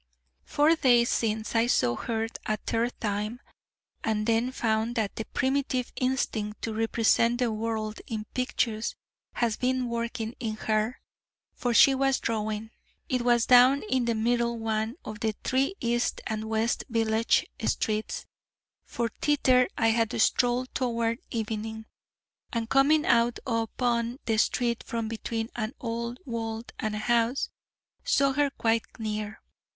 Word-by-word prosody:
Four 305 Hz, +3 st, +3 dB
days 245 Hz, -5 st, +4 dB
since 220 Hz, -1 st, -1 dB
I 230 Hz, +1 st, +3 dB
saw 120 Hz, -, +2 dB
her 225 Hz, -, -2 dB, 0.2 s
a 215 Hz, -, +1 dB
third 230 Hz, +3 st, -1 dB
time, 210 Hz, +2 st, -2 dB, 0.6 s
and 215 Hz, -1 st, 0 dB
then 230 Hz, +2 st, +2 dB
found 225 Hz, -1 st, 0 dB
that 215 Hz, -3 st, -1 dB
the 225 Hz, -, -4 dB
primitive 265 Hz, -2 st, -1 dB
instinct 235 Hz, -5 st, -1 dB
to 225 Hz, -, -2 dB
represent 225 Hz, +1 st, +2 dB
the 245 Hz, -2 st, +1 dB
world 220 Hz, 0 st, -3 dB
in 215 Hz, -2 st, -4 dB
pictures 230 Hz, -3 st, -1 dB, 0.4 s
has 230 Hz, -3 st, 0 dB
been 255 Hz, 0 st, 0 dB
working 235 Hz, -1 st, -3 dB
in 220 Hz, -3 st, -3 dB
her: 215 Hz, +2 st, -1 dB, 0.5 s
for 245 Hz, -, -1 dB
she 275 Hz, +1 st, +8 dB
was 270 Hz, 0 st, +2 dB
drawing. 220 Hz, 0 st, -2 dB, 0.4 s
It 250 Hz, -1 st, +1 dB
was 240 Hz, -1 st, +3 dB
down 255 Hz, +2 st, +6 dB
in 255 Hz, -2 st, +2 dB
the 235 Hz, -1 st, +1 dB
middle 235 Hz, +1 st, +1 dB
one 220 Hz, +1 st, -1 dB
of 215 Hz, -1 st, -6 dB
the 220 Hz, -1 st, -1 dB
three 270 Hz, +8 st, +1 dB
east 240 Hz, 0 st, 0 dB
and 220 Hz, -1 st, -3 dB
west 220 Hz, +1 st, 0 dB
village 225 Hz, -1 st, +2 dB, 0.2 s
streets, 215 Hz, 0 st, -1 dB, 0.6 s
for 235 Hz, -1 st, -2 dB
thither 255 Hz, -4 st, +4 dB
I 225 Hz, -, +3 dB
had 225 Hz, -1 st, +1 dB
strolled 245 Hz, +3 st, +2 dB
toward 230 Hz, -2 st, 0 dB
evening, 220 Hz, 0 st, -4 dB, 0.7 s
and 230 Hz, -2 st, -2 dB
coming 285 Hz, +5 st, +4 dB
out 235 Hz, 0 st, +3 dB
upon 235 Hz, 0 st, 0 dB
the 225 Hz, -1 st, +1 dB
street 235 Hz, 0 st, +1 dB
from 230 Hz, -1 st, -3 dB
between 225 Hz, 0 st, -3 dB
an 220 Hz, +1 st, -3 dB
old 235 Hz, 0 st, -3 dB
wall 225 Hz, -2 st, -3 dB, 0.2 s
and 215 Hz, -1 st, -2 dB
a 210 Hz, -, -4 dB
house, 235 Hz, +2 st, +2 dB, 0.5 s
saw 275 Hz, -1 st, +3 dB
her 290 Hz, +1 st, +2 dB
quite 230 Hz, -4 st, 0 dB
near. 215 Hz, -1 st, -4 dB
230 Hz, 145 wpm, -28 LUFS, 220-245 Hz, 0.7 s, she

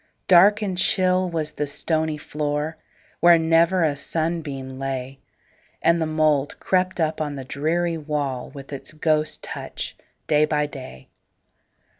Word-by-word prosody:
Dark 200 Hz, +4 st, +6 dB
and 185 Hz, -3 st, -2 dB
chill 185 Hz, -1 st, +2 dB
was 160 Hz, -3 st, -2 dB
the 150 Hz, -1 st, -3 dB
stony 155 Hz, +1 st, 0 dB
floor, 150 Hz, +1 st, -3 dB, 0.4 s
Where 175 Hz, -1 st, +7 dB
never 165 Hz, +2 st, +3 dB
a 150 Hz, -3 st, +1 dB
sunbeam 145 Hz, -4 st, -3 dB
lay, 135 Hz, 0 st, -4 dB, 0.6 s
And 170 Hz, +1 st, +3 dB
the 160 Hz, -, +1 dB
mould 155 Hz, -2 st, +1 dB
crept 185 Hz, -1 st, 0 dB
up 160 Hz, -1 st, 0 dB
on 145 Hz, -2 st, -2 dB
the 135 Hz, -2 st, -7 dB
dreary 165 Hz, +5 st, -1 dB
wall, 145 Hz, -4 st, -3 dB
With 140 Hz, 0 st, -10 dB
its 140 Hz, -, -4 dB
ghost 155 Hz, 0 st, 0 dB
touch, -, -, -6 dB, 0.3 s
day 150 Hz, -1 st, +3 dB
by 150 Hz, -1 st, 0 dB
day. 130 Hz, -, -10 dB
155 Hz, 140 wpm, -23 LUFS, 145-165 Hz, 0.6 s, Where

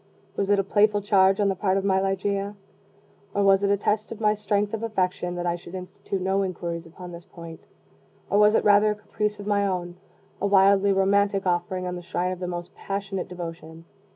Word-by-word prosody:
Was 200 Hz, -1 st, -1 dB
it 205 Hz, -, +4 dB
a 195 Hz, -, +2 dB
playful 205 Hz, +1 st, +2 dB
charge 195 Hz, -1 st, +4 dB
on 205 Hz, -, +3 dB
the 195 Hz, -, +1 dB
part 190 Hz, 0 st, +1 dB
of 195 Hz, -, -1 dB
my 190 Hz, -1 st, +3 dB
Ligeia? 200 Hz, +1 st, -1 dB, 0.8 s
or 200 Hz, -, +2 dB
was 195 Hz, 0 st, +5 dB
it 200 Hz, -, +1 dB
a 200 Hz, -, +3 dB
test 210 Hz, +2 st, -1 dB
of 225 Hz, -, -7 dB
my 210 Hz, -1 st, +3 dB
strength 205 Hz, 0 st, -1 dB
of 225 Hz, -, -3 dB
affection, 185 Hz, -5 st, -1 dB
that 175 Hz, 0 st, -3 dB
I 175 Hz, -1 st, 0 dB
should 175 Hz, +1 st, -10 dB
institute 190 Hz, +1 st, -5 dB
no 190 Hz, +1 st, 0 dB
inquiries 170 Hz, -3 st, -4 dB
upon 180 Hz, +2 st, -10 dB
this 170 Hz, 0 st, -10 dB
point? 165 Hz, -2 st, -11 dB, 0.6 s
or 205 Hz, -, +2 dB
was 210 Hz, +1 st, +5 dB
it -, -, +3 dB
rather 205 Hz, +1 st, +5 dB
a 210 Hz, -, 0 dB
caprice 210 Hz, 0 st, -3 dB
of 205 Hz, -, -7 dB
my 205 Hz, -1 st, +1 dB
own 175 Hz, -2 st, -3 dB, 0.4 s
a 200 Hz, -, +2 dB
wildly 200 Hz, 0 st, +5 dB
romantic 195 Hz, 0 st, +2 dB
offering 180 Hz, +1 st, -1 dB
on 180 Hz, 0 st, -3 dB
the -, -, -7 dB
shrine 180 Hz, +1 st, -2 dB
of 185 Hz, -, -5 dB
the 180 Hz, -, -4 dB
most 175 Hz, +1 st, -6 dB
passionate 195 Hz, -1 st, -4 dB
devotion? 165 Hz, -2 st, -8 dB
195 Hz, 215 wpm, -25 LUFS, 180-205 Hz, 0.8 s, was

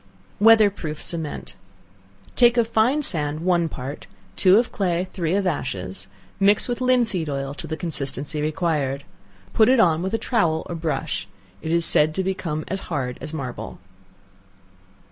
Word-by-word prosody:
Weather 220 Hz, -1 st, +6 dB
Proof 155 Hz, -6 st, -6 dB
Cement. 160 Hz, -3 st, -3 dB, 0.8 s
Take 240 Hz, 0 st, +5 dB
of 235 Hz, -2 st, +3 dB
fine 240 Hz, +7 st, +2 dB
sand 155 Hz, -, -1 dB
one 170 Hz, -2 st, +1 dB
part, 135 Hz, +1 st, -7 dB, 0.3 s
two 190 Hz, +1 st, +6 dB
of 235 Hz, +1 st, +1 dB
clay, 180 Hz, -2 st, -1 dB
three 170 Hz, -1 st, -1 dB
of 200 Hz, -1 st, 0 dB
ashes; 95 Hz, -, -3 dB, 0.3 s
mix 200 Hz, +1 st, +3 dB
with 245 Hz, 0 st, -3 dB
linseed 235 Hz, -10 st, +2 dB
oil 135 Hz, 0 st, -3 dB
to -, -, -8 dB
the 160 Hz, -, -4 dB
consistency 150 Hz, -2 st, -3 dB
required. 150 Hz, -3 st, -1 dB, 0.5 s
Put 220 Hz, 0 st, +5 dB
it 260 Hz, -1 st, +4 dB
on 165 Hz, -6 st, +4 dB
with 190 Hz, +4 st, -1 dB
a -, -, +2 dB
towel 170 Hz, -11 st, 0 dB
or -, -, -6 dB
brush. 160 Hz, -7 st, -3 dB, 0.3 s
It 160 Hz, -, -4 dB
is 170 Hz, 0 st, +4 dB
said 155 Hz, +1 st, +3 dB
to 190 Hz, -, 0 dB
become 170 Hz, -5 st, -3 dB
as 195 Hz, -, -3 dB
hard 130 Hz, -6 st, -3 dB
as -, -, -4 dB
marble. 135 Hz, -6 st, -6 dB
170 Hz, 160 wpm, -23 LUFS, 150-200 Hz, 0.8 s, Weather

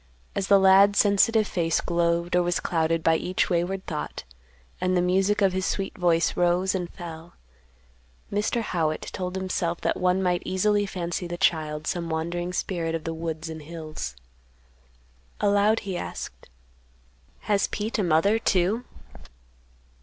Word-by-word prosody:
As 195 Hz, -, -2 dB
the 200 Hz, -, +7 dB
lad's 195 Hz, +1 st, +6 dB
sensitive 215 Hz, +2 st, +4 dB
face 165 Hz, -2 st, 0 dB
glowed 170 Hz, 0 st, 0 dB
or 180 Hz, -, +4 dB
was 175 Hz, 0 st, 0 dB
clouded 165 Hz, -1 st, 0 dB
by 160 Hz, 0 st, +4 dB
each 185 Hz, +2 st, -1 dB
wayward 180 Hz, +2 st, -1 dB
thought, 75 Hz, 0 st, -5 dB, 0.6 s
and 185 Hz, 0 st, +1 dB
the -, -, +4 dB
music 195 Hz, +3 st, +2 dB
of 190 Hz, -2 st, +3 dB
his 190 Hz, 0 st, -1 dB
sweet 195 Hz, -1 st, -2 dB
voice 170 Hz, -4 st, +2 dB
rose 175 Hz, +2 st, +2 dB
and 180 Hz, -3 st, -3 dB
fell, 165 Hz, -1 st, -9 dB, 1.0 s
Mr. 210 Hz, +3 st, 0 dB
Howitt 160 Hz, -6 st, -1 dB
told 180 Hz, 0 st, -4 dB
himself 180 Hz, -2 st, -2 dB
that -, -, 0 dB
one 185 Hz, +1 st, +2 dB
might 180 Hz, -1 st, +1 dB
easily 205 Hz, +2 st, +1 dB
fancy 175 Hz, -1 st, -3 dB
the 175 Hz, 0 st, -5 dB
child 155 Hz, -3 st, 0 dB
some 170 Hz, -1 st, -2 dB
wandering 170 Hz, +2 st, -2 dB
spirit 170 Hz, -2 st, -2 dB
of 165 Hz, -, -4 dB
the 165 Hz, -, -3 dB
woods 160 Hz, 0 st, -4 dB
and 160 Hz, -1 st, -7 dB
hills. 155 Hz, -, -6 dB, 1.2 s
Aloud, 205 Hz, +2 st, +3 dB
he 195 Hz, -3 st, -4 dB
asked, -, -, -7 dB, 0.9 s
"Has 205 Hz, -1 st, +1 dB
Pete 215 Hz, +2 st, -3 dB
a -, -, +2 dB
mother, 180 Hz, +6 st, +3 dB
too?" 205 Hz, +4 st, +1 dB
180 Hz, 150 wpm, -25 LUFS, 165-195 Hz, 1.2 s, the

